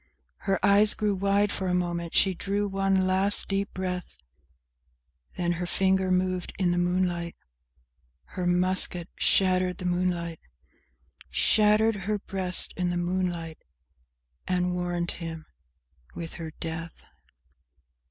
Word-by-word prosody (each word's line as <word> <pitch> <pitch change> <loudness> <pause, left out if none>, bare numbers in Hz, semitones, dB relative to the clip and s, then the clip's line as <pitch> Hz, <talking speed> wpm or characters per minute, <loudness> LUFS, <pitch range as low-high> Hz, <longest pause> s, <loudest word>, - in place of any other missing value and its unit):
Her 195 - +2
eyes 205 +1 +5
grew 210 -2 -1
wide 200 +1 +1
for 190 - -3
a 180 - 0
moment; 175 -1 -3
she 190 - +4
drew 200 +3 -2
one 195 -1 0
last 190 +2 +6
deep 195 0 -2
breath, 180 -1 -5 1.2
Then 175 -1 -1
her 175 - -3
finger 190 0 +1
moved 185 -1 -1
in 185 -3 +1
the 175 - 0
moonlight, 175 -1 -1 1.0
Her 180 -1 -3
musket 180 0 +1
shattered 185 -1 +2
the 180 - -8
moonlight, 175 -2 -2 0.9
Shattered 215 +1 +3
her 205 +2 -2
breast 190 -2 +2
in 180 -1 -1
the 175 - -2
moonlight 175 -2 -3 0.9
and 180 -1 0
warned 175 -1 -2
him—with 70 - -10
her 165 -2 -7
death. 165 +1 -7
180 Hz, 120 wpm, -26 LUFS, 175-195 Hz, 1.2 s, last